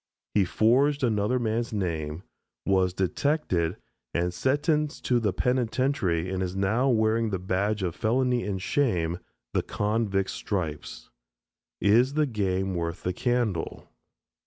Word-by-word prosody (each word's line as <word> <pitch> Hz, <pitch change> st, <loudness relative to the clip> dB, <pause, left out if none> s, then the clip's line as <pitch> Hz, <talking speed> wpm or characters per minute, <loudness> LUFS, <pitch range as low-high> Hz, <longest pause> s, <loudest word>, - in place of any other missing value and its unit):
He 100 Hz, -3 st, +4 dB
forged 135 Hz, +9 st, +3 dB
another 110 Hz, +1 st, +2 dB
man's 115 Hz, -1 st, -1 dB
name, 85 Hz, -5 st, -3 dB, 0.4 s
was 95 Hz, -2 st, +3 dB
detected, 95 Hz, -, 0 dB, 0.4 s
and 90 Hz, +1 st, 0 dB
sentenced 150 Hz, -, 0 dB
to 125 Hz, -1 st, +3 dB
the 105 Hz, -4 st, +1 dB
penitentiary 125 Hz, -7 st, 0 dB
and 95 Hz, -1 st, -2 dB
is 90 Hz, 0 st, -2 dB
now 110 Hz, +8 st, +2 dB
wearing 110 Hz, -1 st, +2 dB
the 95 Hz, -, -1 dB
badge 95 Hz, +3 st, -1 dB
of 90 Hz, -3 st, -1 dB
felony 125 Hz, +2 st, +1 dB
and 100 Hz, -2 st, -2 dB
shame 90 Hz, -, 0 dB, 0.3 s
the -, -, +2 dB
convict's 105 Hz, -2 st, -1 dB
stripes. 75 Hz, -, -4 dB, 0.7 s
Is 120 Hz, +7 st, +4 dB
the 155 Hz, -1 st, +3 dB
game 95 Hz, -6 st, -1 dB
worth 85 Hz, +1 st, -3 dB
the 90 Hz, -, -1 dB
candle? 120 Hz, -6 st, -1 dB
105 Hz, 130 wpm, -27 LUFS, 90-125 Hz, 0.7 s, He